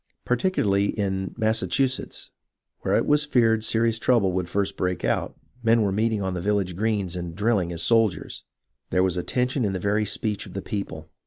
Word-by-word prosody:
Particularly 115 - +1
in 95 -1 -2
Massachusetts, 125 +4 0 0.5
where - - 0
it - - +2
was 150 0 +3
feared 115 -6 +2
serious 115 0 +2
trouble 115 -5 +3
would 90 -1 -2
first 100 +1 -1
break 90 -5 -2
out, - - -1 0.2
men 115 -1 +4
were 100 - +1
meeting 110 +1 0
on 95 -1 -2
the 90 - -3
village 100 -2 0
greens 100 -3 -1
and 85 -2 -5
drilling 100 -4 +1
as 85 -1 -3
sol 115 +1 +5
diers. - - -8 0.5
There 90 - +2
was 95 -2 +1
a 90 - -1
tension 125 +5 0
in 100 -3 0
the 95 - -2
very 105 +3 0
speech 105 0 -2
of - - -12
the 95 - -4
people. 80 -6 -5
105 Hz, 190 wpm, -25 LUFS, 95-115 Hz, 0.5 s, sol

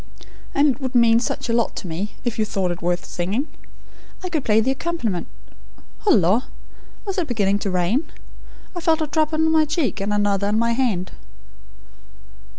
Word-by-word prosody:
And 285 +2 +5
it 280 - -15
would 260 -1 -4
mean 230 -1 +6
such 240 - -3
a 230 - 0
lot 235 0 +1
to 190 - -5
me, 175 +6 -4
if 235 -2 -2
you - - +4
thought 195 -4 -1
it 175 - -6
worth 175 0 -1
singing. 200 - -2 0.8
I 365 - -3
could 315 -6 -1
play 215 0 +4
the 245 +4 +2
accompaniment 270 - -2 0.8
Hullo! 210 - +5 0.7
Is 390 -1 -1
it 340 - -1
beginning 205 -4 +1
to 200 - -2
rain? 185 - 0 0.6
I - - -3
felt 325 -1 +2
a - - +2
drop 310 +1 +1
on 320 0 +2
my 315 -1 +5
cheek, 290 - -1
and 200 +1 -1
another 205 -1 +1
on 210 +1 +1
my 235 +1 +2
hand." 225 -8 0
230 Hz, 180 wpm, -22 LUFS, 200-300 Hz, 0.8 s, mean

